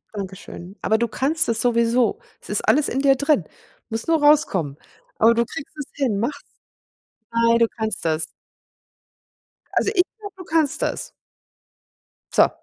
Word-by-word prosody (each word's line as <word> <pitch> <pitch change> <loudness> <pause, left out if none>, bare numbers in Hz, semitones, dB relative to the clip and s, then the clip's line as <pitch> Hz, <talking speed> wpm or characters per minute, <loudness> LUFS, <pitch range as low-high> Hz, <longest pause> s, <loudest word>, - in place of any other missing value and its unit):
Dankeschön, 190 -1 -8
aber 220 - +2
du 235 - 0
kannst 285 +9 +1
das 230 -1 +1
sowieso. 235 - +2 0.2
Es - - -14
ist - - 0
alles 300 - +3
in 265 - -1
dir 275 -1 +4
drin. 285 - +2 0.5
Muss 225 +1 -3
nur 325 -2 +2
rauskommen, 200 - +3 0.4
aber 230 +1 +5
du 235 - +2
kriegst 280 +5 -9
es 295 - -5
hin, 250 -8 0
mach's. 280 +6 -2 0.9
Ei, 230 0 +3
du 230 - +4
kannst 220 -2 -1
das. 160 -1 +1 1.5
Also, - - +2
ich 360 - +5 0.2
glaube, 405 -3 -9
du 370 - -10
kannst 320 - 0
das. - - -2 1.2
So! - - +5
235 Hz, 150 wpm, -22 LUFS, 220-295 Hz, 1.5 s, aber